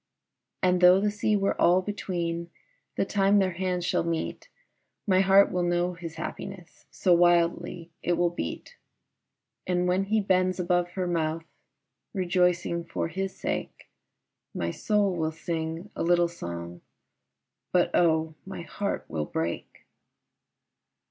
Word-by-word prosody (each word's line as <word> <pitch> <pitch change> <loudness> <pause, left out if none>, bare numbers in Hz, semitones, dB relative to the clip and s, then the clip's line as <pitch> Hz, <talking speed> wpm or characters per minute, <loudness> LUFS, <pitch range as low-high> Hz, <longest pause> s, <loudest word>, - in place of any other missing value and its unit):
And 180 -1 +3
tho' 180 +1 +8
the 205 +1 +1
sea 210 +1 +1
were 195 -1 0
all 180 +2 +5
between, 170 -4 -3 0.5
The - - +1
time 200 0 +3
their 190 -2 +3
hands 180 0 -2
shall - - +1
meet, 165 - -3 0.6
My 190 -3 +3
heart 195 +1 +5
will 180 -1 0
know 175 +1 +1
his 165 -2 -8
happiness, 190 -3 -8
So 180 - +2
wildly 175 0 +2
it 175 - +1
will 175 0 +2
beat. 485 - -6 0.9
And 180 0 +1
when 185 +2 +1
he 220 +2 +2
bends 185 -2 +1
above 175 0 +1
her 185 -2 -2
mouth, 165 -2 -1 0.7
Rejoicing 180 -2 +1
for 165 - -3
his 190 +3 -3
sake, - - -5 0.6
My 85 0 -1
soul 205 - +1
will 160 -2 -1
sing 165 +3 -4
a - - -4
little 175 0 +3
song, 85 - -7 0.9
But 175 -1 +3
oh, 160 -2 +2
my 190 -3 -7
heart 200 +3 -3
will 80 -1 -3
break. 80 +3 -4
175 Hz, 135 wpm, -27 LUFS, 170-190 Hz, 0.9 s, tho